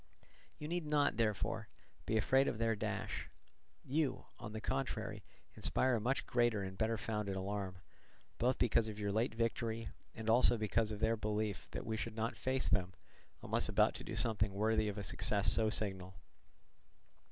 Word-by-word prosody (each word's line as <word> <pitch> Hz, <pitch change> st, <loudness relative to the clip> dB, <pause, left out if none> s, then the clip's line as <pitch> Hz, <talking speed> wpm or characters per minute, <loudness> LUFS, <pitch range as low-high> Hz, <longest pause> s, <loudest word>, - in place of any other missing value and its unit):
You 150 Hz, -, -6 dB
need 170 Hz, -1 st, -2 dB
not, 150 Hz, -1 st, +2 dB
therefore, 110 Hz, -4 st, 0 dB, 0.4 s
be 110 Hz, -, +2 dB
afraid 135 Hz, +6 st, +3 dB
of -, -, -1 dB
their 115 Hz, 0 st, +1 dB
dash. 110 Hz, 0 st, -4 dB, 0.6 s
You, 145 Hz, +1 st, -1 dB
on 110 Hz, -3 st, -7 dB
the 110 Hz, -, -5 dB
contrary, 110 Hz, -5 st, -3 dB, 0.3 s
inspire 130 Hz, -2 st, +1 dB
a -, -, -4 dB
much 130 Hz, +5 st, 0 dB
greater 120 Hz, -4 st, +1 dB
and 95 Hz, 0 st, -6 dB
better 110 Hz, +3 st, 0 dB
founded 105 Hz, -2 st, -3 dB
alarm, 95 Hz, 0 st, -3 dB, 0.6 s
both 125 Hz, +2 st, +2 dB
because 115 Hz, -1 st, +3 dB
of 105 Hz, -1 st, -6 dB
your 100 Hz, -1 st, -1 dB
late 110 Hz, +3 st, 0 dB
victory 115 Hz, -1 st, -1 dB, 0.3 s
and 110 Hz, 0 st, -7 dB
also 120 Hz, +2 st, +5 dB
of 110 Hz, -1 st, 0 dB
their 110 Hz, +1 st, +2 dB
belief 105 Hz, -1 st, -2 dB
that -, -, -6 dB
we 110 Hz, 0 st, -2 dB
should 110 Hz, 0 st, -4 dB
not 115 Hz, +1 st, -2 dB
face 130 Hz, 0 st, 0 dB
them 95 Hz, -2 st, 0 dB, 0.5 s
unless -, -, 0 dB
about -, -, +4 dB
to -, -, -7 dB
do -, -, -5 dB
something 105 Hz, -3 st, +1 dB
worthy 110 Hz, +1 st, +2 dB
of 105 Hz, 0 st, -3 dB
a 105 Hz, -, -3 dB
success 100 Hz, +3 st, +4 dB
so 110 Hz, -1 st, +5 dB
signal. 95 Hz, -3 st, -3 dB
110 Hz, 170 wpm, -36 LUFS, 105-115 Hz, 0.6 s, also